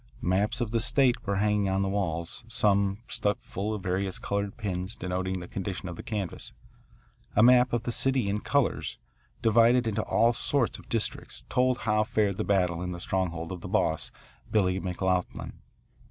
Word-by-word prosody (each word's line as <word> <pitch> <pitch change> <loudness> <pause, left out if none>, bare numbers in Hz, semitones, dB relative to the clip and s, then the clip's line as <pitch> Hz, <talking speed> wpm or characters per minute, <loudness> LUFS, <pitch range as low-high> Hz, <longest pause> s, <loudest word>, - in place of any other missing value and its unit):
Maps 100 +6 +1
of 115 -3 -1
the 115 - +2
state 125 -1 +2
were 100 - +1
hanging 105 0 +2
on 95 +1 +1
the - - 0
walls, 85 -4 -2
some 100 -4 +2
stuck 105 0 0
full 100 +3 -4
of 105 -3 -4
various 95 0 -1
coloured 100 0 -3
pins 95 -1 -3
denoting 95 +1 -2
the 90 - -8
condition 95 -2 -4
of 85 - -5
the - - -7
canvass. 100 -6 -4 0.8
A 105 - +6
map 125 +1 +6
of 120 -1 0
the 120 - -2
city 130 -2 +2
in 100 +1 0
colours, - - 0 0.5
divided 115 +2 +5
into 110 -1 0
all 115 +2 +3
sorts 125 +1 0
of - - -16
districts, 115 -2 -2
told 125 0 +2
how 105 -1 +2
fared 105 -3 0
the - - 0
battle 90 -4 +1
in 90 0 -3
the 85 - -6
stronghold 85 -2 -2
of 90 -2 -6
the - - -6
boss, - - +1 0.4
Billy 95 -3 +2
McLoughlin. 90 0 -2
100 Hz, 180 wpm, -28 LUFS, 95-115 Hz, 0.8 s, A